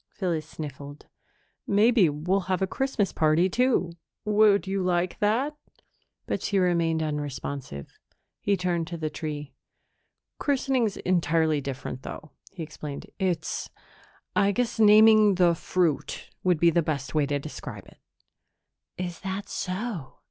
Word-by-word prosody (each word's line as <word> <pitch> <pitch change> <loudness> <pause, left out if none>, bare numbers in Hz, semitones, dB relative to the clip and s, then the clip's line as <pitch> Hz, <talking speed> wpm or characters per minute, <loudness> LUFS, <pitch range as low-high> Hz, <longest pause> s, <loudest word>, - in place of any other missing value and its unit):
Phyllis 165 -5 -3
sniffled. 145 -2 -8 0.6
"Maybe 210 -2 +4
we'll 165 +7 0
have 185 -2 +1
a - - +4
Christmas 235 -2 -1
party, 160 +3 +3
too. 235 -4 +1 0.3
Would 210 -1 +4
you 195 0 -1
like 180 -1 0
that?" 245 +9 +1 0.7
But - - -2
she 200 - 0
remained 170 -3 +2
unresponsive. 140 - -4 0.5
He 200 -1 +1
turned 175 -2 -1
to 170 - -5
the 155 -1 -3
tree. 150 -2 -5 0.9
"Christening's 260 -6 +1
entirely 160 -3 +1
different, 135 -1 -5
though," 155 +2 -8 0.2
he 180 -4 -6
explained. 150 -2 -8
"It's 175 -4 -1 0.7
I 200 0 +4
guess 235 +2 -1
naming 215 -1 +7
the 175 -1 +4
fruit 170 -2 -1
would 180 -4 +2
be 170 +1 +5
the 170 - +3
best 140 -4 -3
way 150 -2 +2
to 145 0 0
describe 150 +2 -8
it." - - -19 1.0
"Is 175 -2 -4
that 195 +1 -5
so?" 185 - -4
175 Hz, 135 wpm, -26 LUFS, 155-200 Hz, 1.0 s, naming